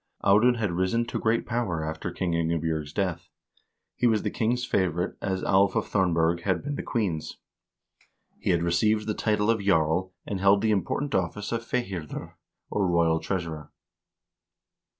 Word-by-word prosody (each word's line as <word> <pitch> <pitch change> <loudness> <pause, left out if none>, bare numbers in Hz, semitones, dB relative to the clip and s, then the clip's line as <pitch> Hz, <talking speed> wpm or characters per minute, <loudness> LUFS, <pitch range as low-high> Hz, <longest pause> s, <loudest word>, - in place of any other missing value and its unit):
Audun 110 +5 +5
had 105 -5 -1
risen 95 +7 0
to - - -3
great 115 +1 +1
power 110 -10 -1
after 80 0 -4
Queen 90 -2 -2
Inge 85 0 +1
bj0rg's 80 -2 -2
death. 90 -1 -2 0.7
He 125 - +2
was 110 -3 +2
the - - -1
king's 125 +1 0
favorite, 90 -3 0
as 95 -2 -2
Alv 95 0 +3
of - - -1
Thornberg 85 -3 +2
had 95 0 0
been 145 +1 -3
the - - -3
queen's. 90 -10 -2 1.0
He - - -2
had 85 -2 +2
received 105 +5 +2
the 105 - -1
title 105 0 +1
of 110 -2 0
jarl, 90 -1 +1
and 100 - -3
held 100 +1 +4
the 110 - +2
important 105 - -1
office 95 +3 -1
of 115 -1 -1
fihirdir, 100 -10 -4 0.4
or 100 -2 +1
royal 85 -2 +3
treasurer. 85 -6 -4
95 Hz, 165 wpm, -27 LUFS, 85-110 Hz, 1.0 s, Audun